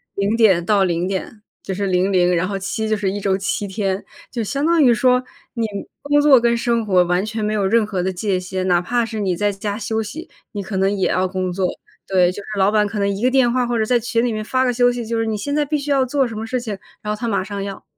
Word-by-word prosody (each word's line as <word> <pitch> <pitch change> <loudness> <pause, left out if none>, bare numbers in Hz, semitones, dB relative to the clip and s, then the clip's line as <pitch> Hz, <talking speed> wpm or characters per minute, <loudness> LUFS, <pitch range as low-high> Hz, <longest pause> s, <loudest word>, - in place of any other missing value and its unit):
0 200 +3 0
点 195 -7 +4
到 200 0 +3
0 175 0 0
点 195 +2 -4 0.2
就 190 - -4
是 200 +1 -2
00， 180 -1 +2
然 175 +2 0
后 195 -1 -3
7 215 +3 -3
就 215 - +1
是 200 -2 -1
1 205 - -3
周 195 -1 +1
7 200 +1 -2
天， 195 0 -2 0.2
就 235 -3 -3
相 280 +7 -2
当 330 -2 +4
于 245 -2 +6
说 250 +2 +3 0.3
你 230 -2 -1 0.4
工 290 0 +3
作 280 -4 +7
跟 235 0 +2
生 235 -1 0
活 185 -3 +4
完 180 +3 0
全 220 0 -4
没 210 +1 0
有 200 -2 0
任 225 +3 +3
何 190 -4 -2
的 190 0 -1
界 185 0 -1
限， 185 0 -3
哪 175 -1 +4
怕 240 +6 0
是 225 -1 -4
你 185 -3 0
在 205 +3 +1
家 205 +2 -4
休 220 0 -2
息， 320 +11 -8 0.2
你 205 -3 -4
可 195 0 -4
能 195 +2 +2
也 190 - 0
要 185 0 +1
工 185 -1 -2
作。 185 +1 -1 0.4
对， 180 -2 +3
就 - - -11
是 - - -16
老 195 +2 +4
板 210 -1 +3
可 205 0 -4
能 200 0 +1
一 200 +3 -3
个 255 - +3
电 260 -3 +4
话， 250 0 +1
或 240 -1 -1
者 - - +2
在 240 +2 +2
群 230 0 0
里 245 - +1
面 215 0 -4
发 260 +2 +1
个 250 - +2
消 245 0 +3
息， 245 -1 -4
就 230 +1 -2
是 225 - 0
你 220 -1 -1
现 285 +8 -3
在 300 -1 +2
必 300 - -2
须 285 +1 -6
要 270 -2 +3
做 270 0 +1
什 225 - -7
么 220 - -4
事 250 +2 -2
情， 215 -5 -5 0.2
然 210 -1 -3
后 210 - -7
他 235 - -2
马 200 -4 0
上 200 0 -5
要。 195 -1 -7
210 Hz, 285 characters per minute, -20 LUFS, 190-235 Hz, 0.4 s, 作